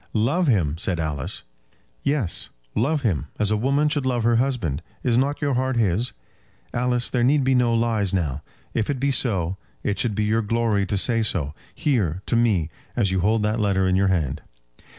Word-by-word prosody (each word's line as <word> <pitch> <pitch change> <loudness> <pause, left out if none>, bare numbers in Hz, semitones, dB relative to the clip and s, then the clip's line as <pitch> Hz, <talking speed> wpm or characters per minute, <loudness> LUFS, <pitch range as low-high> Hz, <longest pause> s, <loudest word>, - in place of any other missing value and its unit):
"Love 140 +11 +1
him!" 80 - +1
said 90 -1 -1
Alice. 75 -4 -3 0.6
"Yes; 140 - -1 0.2
love 140 +6 0
him: 85 - 0
as 105 0 +1
a - - +3
woman 140 +7 +2
should 145 -2 0
love 120 -3 0
her 115 0 +3
husband. 115 - 0 0.2
Is 120 -2 +2
not 140 +5 +1
your 140 -1 +1
heart 130 +1 0
his? 110 +2 +1 0.6
Alice, 125 0 0
there 120 -2 0
need 140 +3 +3
be 130 +1 +2
no 125 -2 +3
lies 115 -4 +1
now. 75 -7 -1 0.3
If 110 - -1
it 140 -3 -1
be 140 +2 +1
so, 95 -9 +1 0.3
it 100 - -1
should 115 -4 0
be 105 - 0
your 110 +2 +2
glory 110 -2 +1
to 100 - 0
say 115 +3 +2
so, 80 -9 0 0.2
here, 100 - 0
to - - 0
me, 100 -9 +2 0.2
as 100 -5 +1
you 95 - +1
hold 105 +4 +2
that 105 +2 0
letter 95 -3 +2
in 95 - +2
your 95 +1 +3
hand." 80 -6 0
110 Hz, 195 wpm, -23 LUFS, 95-125 Hz, 0.6 s, a